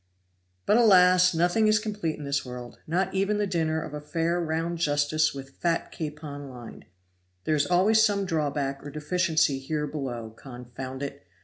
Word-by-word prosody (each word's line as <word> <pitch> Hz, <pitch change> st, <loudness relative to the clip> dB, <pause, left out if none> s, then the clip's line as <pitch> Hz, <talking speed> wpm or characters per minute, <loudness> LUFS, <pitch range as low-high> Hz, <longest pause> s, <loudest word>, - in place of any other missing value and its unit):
But 215 Hz, -, +4 dB
alas! 185 Hz, -5 st, +6 dB
nothing 175 Hz, +6 st, +3 dB
is 215 Hz, 0 st, +5 dB
complete 210 Hz, -7 st, -3 dB
in 150 Hz, -, -8 dB
this 140 Hz, 0 st, -1 dB
world, 125 Hz, -1 st, -9 dB
not 180 Hz, +4 st, 0 dB
even 195 Hz, +2 st, +1 dB
the 210 Hz, -, +1 dB
dinner 160 Hz, -4 st, 0 dB
of 155 Hz, -1 st, -7 dB
a 150 Hz, -, -5 dB
fair 165 Hz, +3 st, -1 dB
round 165 Hz, +1 st, -2 dB
justice 150 Hz, 0 st, +2 dB
with 135 Hz, 0 st, -10 dB
fat 170 Hz, -1 st, 0 dB
capon 150 Hz, -2 st, -6 dB
lined. 120 Hz, -3 st, -11 dB, 0.6 s
There 155 Hz, -, 0 dB
is 145 Hz, -1 st, +2 dB
always 205 Hz, +5 st, +4 dB
some 200 Hz, -2 st, +2 dB
drawback 145 Hz, -5 st, -2 dB
or 145 Hz, -, -7 dB
deficiency 155 Hz, -1 st, +1 dB
here 150 Hz, +2 st, -2 dB
below 125 Hz, -7 st, -5 dB
confound 130 Hz, +2 st, -8 dB
it! 140 Hz, -6 st, -7 dB
155 Hz, 170 wpm, -27 LUFS, 140-180 Hz, 0.6 s, alas